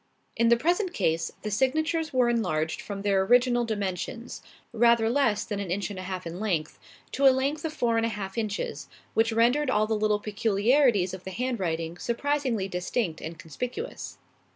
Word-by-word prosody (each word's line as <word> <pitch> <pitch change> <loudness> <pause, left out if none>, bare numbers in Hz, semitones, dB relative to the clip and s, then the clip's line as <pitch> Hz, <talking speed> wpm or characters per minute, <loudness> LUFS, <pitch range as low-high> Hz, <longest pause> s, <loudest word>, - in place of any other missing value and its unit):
In 230 0 +3
the 235 - +5
present 355 - 0
case, 165 -3 0
the 210 - -3
signatures 315 +7 +1
were 255 -3 +3
enlarged 180 -10 0
from 200 -1 -6
their 200 -2 +3
original 240 +3 +3
dimensions 210 +2 -4 0.3
rather 235 0 +4
less 240 -6 +2
than 205 -2 -4
an 200 -3 -4
inch 195 +3 -2
and 190 - -6
a - - -4
half 185 -1 -5
in 170 +2 -6
length 175 -8 -2 0.3
to 275 0 +4
a - - +10
length 275 +4 0
of 320 - -1
four 240 -6 0
and 225 - +2
a - - -2
half 195 -3 -5
inches; 215 -3 -3 0.3
which 225 +1 +2
rendered 245 +6 +3
all 215 -4 +3
the 220 - -1
little 210 -1 +1
peculiarities 210 0 +2
of 190 -1 -7
the - - -6
handwriting 180 -7 -2
surprisingly 250 -4 -1
distinct 180 -1 -2
and 160 +1 -6
conspicuous. 205 - -6
220 Hz, 180 wpm, -27 LUFS, 190-250 Hz, 0.3 s, a